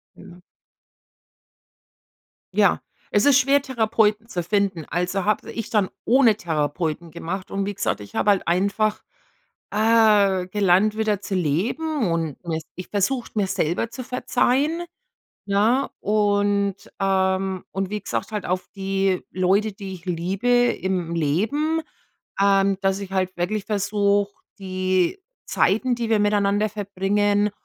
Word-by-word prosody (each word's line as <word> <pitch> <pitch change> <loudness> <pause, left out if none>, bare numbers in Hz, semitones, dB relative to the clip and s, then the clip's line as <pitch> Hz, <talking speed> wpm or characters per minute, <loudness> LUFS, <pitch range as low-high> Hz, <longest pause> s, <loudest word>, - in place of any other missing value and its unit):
Ja. 180 -2 -14 2.2
Ja, - - +3 0.3
es 205 - +2
ist 285 -2 +6
schwer, 275 +1 +3
Therapeuten 220 -4 +1
zu 175 -6 -3
finden. 195 -3 0
Also, 180 +3 -1
habe 210 0 0
ich 225 - -6
dann 205 -4 +2 0.2
ohne 240 -4 +5
Therapeuten 160 0 -2
gemacht 175 +3 -5
und 195 0 -2
wie 205 - -3
gesagt, 205 - -1
ich 100 - -11
habe 210 - +1
halt 195 -4 +2
einfach, 200 +4 +1 0.7
äh, 210 -4 +4
gelernt 205 +2 +2
wieder 215 -3 0
zu 200 - -5
leben 215 - 0
und 165 -4 -2 0.4
mich 185 - -7
versucht, 230 +5 -1
mir 200 -2 +2
selber 175 +7 -1
zu 255 +2 -7
verzeihen, 275 +6 0 0.6
ja, 220 +7 +2
und, 205 -1 +1 0.2
ähm 190 -1 0
und 195 0 -2
wie 210 0 -3
gesagt, 210 - -4
halt 210 -2 -3
auf 185 +1 -2
die 195 -1 0
Leute, 195 +3 +1
die 195 -1 -7
ich 180 0 -11
liebe 185 +6 -2
im 190 -8 +1
Leben, 230 - 0 0.6
ähm, 195 -1 +3
dass 195 0 +1
ich 195 -1 -7
halt 185 -1 -1
wirklich 195 +4 -2
versuche, 205 -1 +1 0.3
die 185 - 0 0.3
Zeiten, 245 +6 +1
die 235 -1 -3
wir 220 - +4
miteinander 205 0 +2
verbringen 205 +1 0
200 Hz, 130 wpm, -23 LUFS, 185-215 Hz, 2.2 s, ist